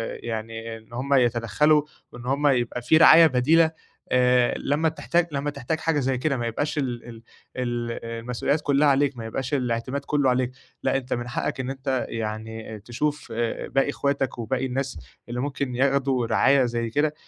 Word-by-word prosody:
أ - - -10
يعني 115 0 -5
إن 110 +1 -18
هُم 135 +4 -1
يتدخّلوا 125 +4 +3 0.3
وإن 120 0 -10
هُم 140 +3 +1
يبقى 125 -3 +1
في 125 +6 +4
رعاية 165 +1 +8
بديلة، 160 +5 +3 0.4
آآ 125 -1 +4
لمّا 155 +3 +1
تحتاج 170 +2 0
لمّا 140 0 -2
تحتاج 145 +2 -3
حاجة 160 -2 +1
زي 135 -1 0
كده 140 +2 0
ما 120 -1 -2
يبقاش 145 +7 -2
ال 125 -5 -2
ال 115 -1 -11 0.3
ال 120 -2 -2
المسؤوليّات 120 +6 -2
كُلّها 145 0 +3
عليك، 140 -1 +2
ما 115 - -6
يبقاش 130 +4 -4
الإعتماد 130 +1 -1
كُلّه 145 -3 +2
عليك، 125 0 +1 0.3
لأ - - +2
أنت 130 -1 -4
من 120 0 -3
حقّك 120 - -3
إن 130 0 -3
أنت 135 -1 -2
يعني 110 0 -5
تشوف 140 +7 -3
أ 115 0 -2
باقي 135 +2 +1
إخواتك، 140 -2 -1
وباقي 125 +3 -2
الناس 135 +1 -3 0.3
اللي 120 +1 -3
ممكن 140 -1 -3
ياخدوا 135 -2 +1
رعاية 135 +1 +4
زي 120 -1 -2
كده، 145 +5 +1
130 Hz, 175 wpm, -24 LUFS, 120-140 Hz, 0.4 s, رعاية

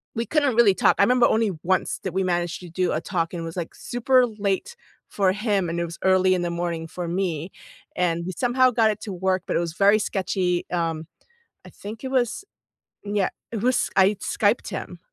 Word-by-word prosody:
we 230 - -1
couldn't 285 -1 +1
really 225 -5 +6
talk. - - +3
I - - +5
remember 250 +2 +4
only 220 -2 +1
once 185 +1 0
that 190 - -4
we 190 0 0
managed 175 -2 -1
to 180 - -10
do 180 +2 -1
a 155 - 0
talk, 170 -3 -2
and 170 - -4
it - - -5
was, 165 - -7
like, 170 -2 -5
super 250 +1 +2
late 210 - -3 0.3
for 195 -2 +2
him, 205 -3 0
and 170 +1 -2
it 170 - 0
was 170 0 -9
early 185 0 +4
in 180 - 0
the 175 - -1
morning 170 -1 -3
for 175 +1 -6
me, 175 -2 -2 0.4
and 170 -2 0
we 185 - -3
somehow 255 +1 +3
got 225 -2 +3
it 210 - -6
to 200 - -6
work, 185 +1 0
but - - -2
it - - +3
was 170 -2 -3
very 205 +3 +4
sketchy. 185 -3 -1
Um, 165 -2 -2 0.6
I - - -12
think 215 +4 -9
it 260 - -4
was 255 - 0 0.6
yeah, 205 -2 0 0.2
it 220 - -3
was 255 +1 +1
I 195 +2 +5
Skyped - - 0
him. - - -6
190 Hz, 220 wpm, -24 LUFS, 175-220 Hz, 0.6 s, really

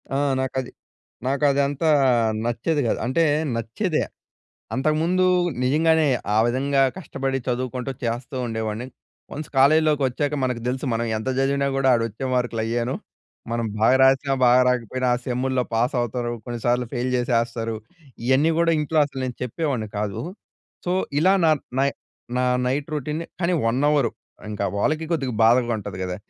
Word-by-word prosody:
ఆ! - - +2 0.2
నాకు 130 0 -3
అది 125 - -10 0.6
నాకు 140 +2 0
అదంతా 140 +3 +1 0.6
నచ్చేది 120 +7 0
కాదు. - - 0
అంటే 135 +7 +2 0.3
నచ్చేదే. 125 - -1 0.7
అంతకుముందు 160 +6 +1 0.4
నిజంగానే, 160 +4 +3 0.3
ఆ - - +4
విధంగా 135 +3 +1 0.2
కష్టపడి 135 -6 -3
చదువుకుంటూ 125 +1 -2
చేస్తూ 120 +4 -3
ఉండేవాడిని. 110 +1 -3 0.5
వన్స్ 150 +2 -6
కాలేజీలోకొచ్చాక 145 -1 +3
మనకు 125 -2 -1
తెలుసు 130 +3 -2
మనం 115 +1 -1
ఎంత 110 +4 -3
చదివినా 140 +1 +1
గూడా, 135 -1 +2
ఆడ 115 - 0
వచ్చే 110 +5 -6
మార్కులు 120 -2 0
అయ్యేను. 120 +2 -1 0.6
మనం 115 0 -1
బాగా 115 +4 +5
రాసినా, 135 +1 +3
బాగా 125 +1 +6
రాకపోయినా, 125 +1 -1
ఆ - - -2
సెమ్ముల్లో 130 0 0
పాస్ 120 +4 +1
అవుతారు. 120 0 -2
కొన్నిసార్లు 120 +1 -1
ఫెయిల్ 125 0 -1
చేసేస్తారు. 115 -2 0 0.5
ఇయన్నీ 135 +6 +3
గూడా 170 0 +3
ఇంట్లో 150 +1 -1
అసలు 140 -2 -8
నేను 125 -2 -5
చెప్పేవాడిని 125 -3 -2
కాదు. 105 -2 -2 0.6
సో, 175 - 0 0.3
ఇలా 190 +3 +5
నా 160 - +5 0.3
నై 140 +1 +3 0.5
నా 125 - +1 0.2
నైట్ 140 +3 -1
రొటీన్‌ని 150 +3 -3
కానీ, 180 0 +1
1 120 +4 +1
అవరు, 145 -6 +2 0.4
ఇంకా 100 -1 -2
వాళ్ళకి 155 +9 0
కొద్దిగా 135 -7 -1
బాధగా 120 +1 +4
ఉంటది 100 -3 -7
కదా! 90 -1 -3
130 Hz, 145 wpm, -23 LUFS, 120-145 Hz, 0.7 s, బాగా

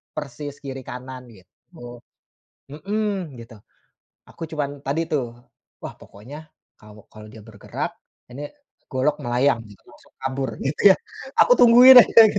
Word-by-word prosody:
persis 145 +1 -7
kiri 135 -2 -8
kanan, 125 +1 -9
gitu. 95 -2 -22 1.2
Mhm, 190 - -4
gitu. 115 0 -13 0.7
Aku 165 - -9
cuman, 145 -2 -5
tadi 145 +4 -2
tuh, 135 -5 -1 0.6
"Wah, - - -6
pokoknya, 145 +10 -13 0.3
kalau 105 -1 -16
kalau 110 0 -13
dia 110 +1 -14
bergerak, 105 -3 -7 0.4
ini 145 +4 -8 0.4
golok 140 +3 0
melayang," 120 +1 +1
gitu, 100 - -17
"langsung - - -21
kabur." 135 -1 -3
Gitu, 150 +8 +4
ya. - - -10 0.4
Aku - - +5
tungguin 245 +2 +8
aja, 230 - +5
gitu. 205 - -2
135 Hz, 135 wpm, -22 LUFS, 120-155 Hz, 1.2 s, tungguin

